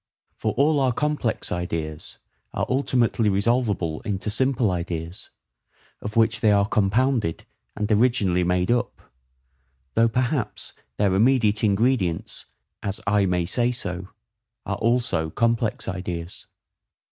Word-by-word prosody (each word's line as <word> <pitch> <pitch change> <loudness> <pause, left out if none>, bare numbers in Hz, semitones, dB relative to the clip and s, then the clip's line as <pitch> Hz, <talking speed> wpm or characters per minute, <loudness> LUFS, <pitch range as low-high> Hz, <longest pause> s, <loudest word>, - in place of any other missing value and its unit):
For - - -2
all 145 +1 +3
our 130 -2 +2
complex 150 -4 -1
ideas 80 -3 -4 0.4
are - - 0
ultimately 125 -4 +1
resolvable 100 -6 0
into 105 0 -3
simple 125 -2 +1
ideas, 85 0 -4 0.7
of 105 - -6
which 115 -1 +3
they 110 - +4
are 100 -1 +4
compounded 110 -1 +1 0.3
and 105 0 -2
originally 105 -5 +3
made 90 +3 +1
up, 120 0 0 0.9
though 115 0 +4
perhaps 125 +1 -2 0.2
their 100 -2 +2
immediate 110 0 +3
ingredients, 100 -4 0 0.3
as 100 -1 -3
I 100 0 +3
may 90 -1 +1
so 120 +7 +1
say, 90 -8 -3 0.7
are - - -2
also 115 -9 +1
complex 115 +3 0
ideas. 90 -2 -5
105 Hz, 120 wpm, -24 LUFS, 90-120 Hz, 0.9 s, they